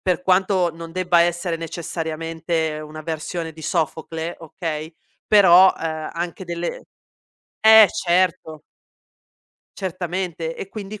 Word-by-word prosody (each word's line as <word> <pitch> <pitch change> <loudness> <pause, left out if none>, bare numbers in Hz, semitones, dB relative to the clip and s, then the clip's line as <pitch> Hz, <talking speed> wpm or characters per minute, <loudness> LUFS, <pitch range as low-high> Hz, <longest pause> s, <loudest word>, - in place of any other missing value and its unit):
Per 180 -1 0
quanto 185 -1 +2
non 165 0 -9
debba 180 0 +2
essere 175 0 0
necessariamente 165 -1 -3
una 155 +1 -9
versione 160 +1 -4
di 160 - -13
Sofocle, 160 +1 -3
okay, 160 -1 -6 0.3
però, 190 -2 +7
ehm, 160 -1 -4
anche 175 +2 -4
delle 170 0 -4 0.8
eh, 220 -1 +9
certo! 170 -3 0 1.2
Certamente, 175 -3 -4
e 195 - -7
quindi 210 0 -8
170 Hz, 110 wpm, -21 LUFS, 160-185 Hz, 1.2 s, eh